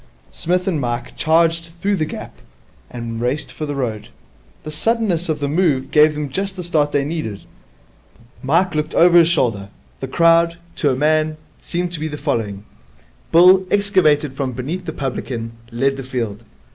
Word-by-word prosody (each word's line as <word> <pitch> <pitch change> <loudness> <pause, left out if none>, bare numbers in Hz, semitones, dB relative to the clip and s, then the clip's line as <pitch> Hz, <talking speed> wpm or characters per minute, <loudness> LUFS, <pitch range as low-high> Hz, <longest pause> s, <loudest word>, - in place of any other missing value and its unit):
Psmith 180 +2 -1
and 165 -6 0
Mike 120 -1 -3
charged 165 +1 +2
through 200 +2 +1
the 160 -4 -1
gap, - - -8 0.6
and 115 -2 -6
raced 130 +2 -2
for 155 +3 -5
the 145 - -3
road. 115 -6 -3 0.6
The 155 - -6
suddenness 180 -1 0
of 155 - -1
the 145 - -1
move 150 -4 +1
gave 150 0 +5
them 150 -1 -3
just 195 +4 -3
the 180 - -6
start 155 -4 +1
they 140 -1 +1
needed. 140 -11 -4 1.0
Mike 170 +7 +2
looked 155 0 -2
over 175 0 +6
his 165 - +5
shoulder. 115 - 0 0.3
The 135 - -4
crowd, 170 +3 +3 0.2
to 145 - +2
a 130 - +1
man, 155 +2 +1 0.2
seemed 175 0 -3
to 170 - -6
be 155 +1 -3
following. 115 -9 -3 0.7
Bill, 185 +3 +7
excavated 175 -9 +2
from 135 -2 -3
beneath 155 +9 -4
the 160 - -3
publican, 125 -5 -4 0.2
led 135 +3 0
the 135 - -5
field. 115 -4 -4
150 Hz, 170 wpm, -19 LUFS, 130-170 Hz, 1.0 s, Bill